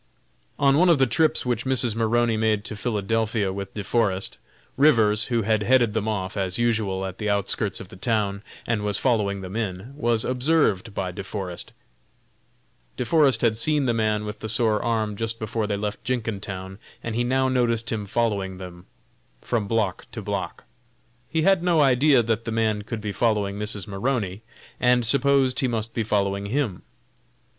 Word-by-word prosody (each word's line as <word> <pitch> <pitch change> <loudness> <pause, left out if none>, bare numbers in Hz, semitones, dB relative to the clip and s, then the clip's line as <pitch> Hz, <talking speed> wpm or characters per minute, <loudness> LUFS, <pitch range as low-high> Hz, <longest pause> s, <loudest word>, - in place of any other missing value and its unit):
On 140 0 +4
one 180 +1 +5
of 170 - +6
the 135 - +4
trips 155 +6 +1
which 120 -2 -1
Mrs. 130 -3 0
Maroney 115 +1 +1
made 110 -1 +1
to 110 - -5
Philadelphia 110 -2 -1
with 100 0 -6
De 105 - -3
Forest, 100 -3 0 0.4
Rivers, 115 -7 +4
who 120 -2 0
had 110 0 +1
headed 120 -1 +3
them 110 -1 -1
off, 100 -2 -2
as 95 -2 -1
usual, 110 -5 0
at 95 -1 -7
the 105 -1 -1
outskirts 100 0 0
of 95 - -10
the - - -11
town, 100 -1 -1 0.2
and 115 -3 0
was 105 -1 -1
following 105 -6 +1
them 95 +1 -7
in, 110 +2 -4
was 120 -5 +1
observed 125 - +1
by 95 -2 -2
De 100 +2 -6
Forest. 95 -3 -5 1.3
De 125 - -2
Forest 135 -4 +3
had 115 -2 +3
seen 145 +5 +2
the 120 - +2
man 110 -2 0
with 105 0 -6
the 110 - -5
sore 110 -2 +2
arm 110 -3 -1
just 115 +2 -3
before 110 0 -2
they 100 -1 -1
left 105 0 -4
Jenkintown, 100 -5 -4 0.2
and 115 - -3
he 120 +2 0
now 130 +2 +1
noticed 120 -2 +1
him 105 -3 -3
following 100 -4 -1
them 90 -1 -10 0.5
from 110 - -2
block 105 -4 -1
to - - -5
block. - - -4 0.7
He 160 +2 0
had 190 0 +4
no 175 -2 +2
idea 135 -1 +5
that 115 0 -1
the 115 - -3
man 110 -2 +1
could 110 +1 -6
be 105 -1 -3
following 100 -2 0
Mrs. 105 -3 -3
Maroney, 100 -1 -2 0.4
and 125 -1 +3
supposed 135 +1 +3
he 130 - +1
must 115 -1 -3
be 115 - -1
following 100 -2 0
him. 115 -6 -1
110 Hz, 180 wpm, -24 LUFS, 100-120 Hz, 1.3 s, of